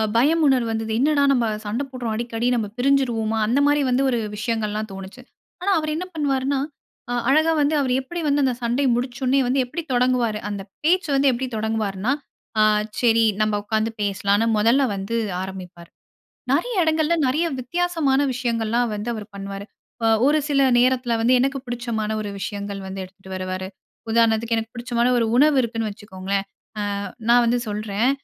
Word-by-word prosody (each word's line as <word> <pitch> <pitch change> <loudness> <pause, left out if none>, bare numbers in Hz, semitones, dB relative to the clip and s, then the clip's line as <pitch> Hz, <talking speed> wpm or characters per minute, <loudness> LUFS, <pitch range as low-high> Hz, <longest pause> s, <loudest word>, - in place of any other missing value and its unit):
பயம் 300 +8 +3
உணர்வு 255 -4 +2
வந்தது. 220 0 -3
என்னடா 285 +1 +3
நம்ம 245 -4 +2 0.2
சண்ட 225 +7 -2
போடுறோம், 245 -4 -3
அடிக்கடி. 235 +1 -2
நம்ம 225 -3 -1
பிரிஞ்சிருவோமா? 245 -4 +1
அந்த 240 +6 +2
மாரி 290 0 +3
வந்து 250 +1 +2
ஒரு 245 - +1 0.2
விஷயங்கள்லாம் 215 -1 -2
தோணுச்சு. 195 +5 -9 0.4
ஆனா, 395 +2 +1
அவரு 310 0 -2
என்ன 350 +3 -3
பண்ணுவாருன்னா? 275 -2 0 0.5
அ - - 0 0.2
அழகா 310 +4 +4
வந்து 290 +2 +2
அவரு 260 -3 +1
எப்பிடி 345 +6 -6
வந்து, 285 0 +2
அந்த 255 - +1
சண்டை 245 +4 +1
முடிச்சோனே 250 +2 0
வந்து 265 +2 +2
எப்பிடி 335 +7 -5
தொடங்குவாரு? 245 -3 +1
அந்த 200 -1 -4 0.2
பேச்சு 345 +1 +2
வந்து 275 0 +4
எப்பிடி 255 +1 -2
தொடங்குவார்னா, 215 0 -1 0.5
அ - - +6 0.4
சரி. 230 -2 +4 0.2
நம்ம 215 -1 +1
உட்காந்து 220 +1 0
பேசலாம்ன்னு, 205 +2 +1
முதல்ல 235 +6 +4
வந்து 195 +4 -3 0.2
ஆரம்பிப்பாரு. 185 -2 -8 0.6
நெறைய 350 - 0
இடங்கள்ல 315 0 +2
நெறைய 305 +7 +1
வித்தியாசமான 320 0 0
விஷயங்கள்லாம் 235 -1 0
வந்து 210 +3 -4
அவரு 215 -2 -7
பண்ணுவாரு. 195 0 -6 0.4
அ - - +4 0.2
ஒரு 305 +2 +4
சில 275 -2 +3
நேரத்துல 250 -1 +2
வந்து, 250 +2 +5
எனக்கு 275 +1 0
புடிச்சமான 235 -3 -3
ஒரு 205 - -5
விஷயங்கள் 200 0 -5
வந்து 190 0 -5
எடுத்துட்டு 190 +1 -15
வருவாரு. 185 0 -4 0.4
உதாரணத்துக்கு 230 0 +2
எனக்கு 225 0 -4
புடிச்சமான 235 0 0
ஒரு 230 - +2
உணவு 295 +1 +5
இருக்குன்னு 225 -2 -2
வச்சுக்கோங்க. 195 -2 -9 0.7
அ - - -4 0.2
நான் 240 0 +6
வந்து 240 +1 +2
சொல்றேன். 210 +3 0
235 Hz, 160 wpm, -22 LUFS, 215-270 Hz, 0.7 s, அ